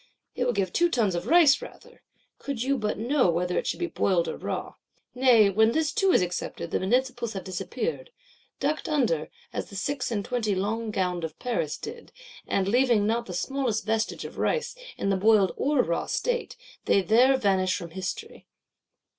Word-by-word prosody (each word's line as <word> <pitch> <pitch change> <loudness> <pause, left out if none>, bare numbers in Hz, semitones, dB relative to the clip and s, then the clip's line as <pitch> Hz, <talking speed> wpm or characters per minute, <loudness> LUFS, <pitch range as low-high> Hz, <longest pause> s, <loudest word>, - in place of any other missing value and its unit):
It 250 - -1
will 245 - +1
give 195 -4 -1
two 345 0 +3
tons 225 - +1
of 175 +4 -3
rice 330 - +6
rather,—could 280 - -9
you 275 +2 +1
but 210 -1 -2
know 245 0 +2
whether 180 +1 0
it - - -5
should - - -2
be 350 - 0
boiled 185 - +1
or - - -3
raw. - - -5 0.4
Nay 250 -4 +5
when 220 +3 +3
this 315 -2 +1
too 390 -4 +2
is 190 - +4
accepted, 175 -1 -4
the - - 0
Municipals 245 +3 0
have 195 - -5
disappeared;—ducked 310 - -5
under, 230 - +1 0.2
as - - -4
the 200 - -11
Six 270 +6 -2
and 205 -4 -2
Twenty 230 -5 -1
Long 220 +4 -2
gowned 180 -4 -1
of 160 -1 -5
Paris 170 - -2
did; 465 +1 -9 0.4
and, 195 -1 0
leaving 240 -1 +3
not 235 +2 0
the 180 - -6
smallest 255 0 -1
vestage 220 0 -1
of - - -9
rice, 480 - -1 0.2
in 195 - 0
the 195 - +1
boiled 205 -1 +4
or 285 -2 +2
raw 170 0 -2
state, 485 -1 -2 0.3
they 195 - +3
there 250 +6 +4
vanish 190 -5 +1
from 170 -1 -8
History! 185 +1 -6
225 Hz, 180 wpm, -26 LUFS, 190-270 Hz, 0.4 s, rice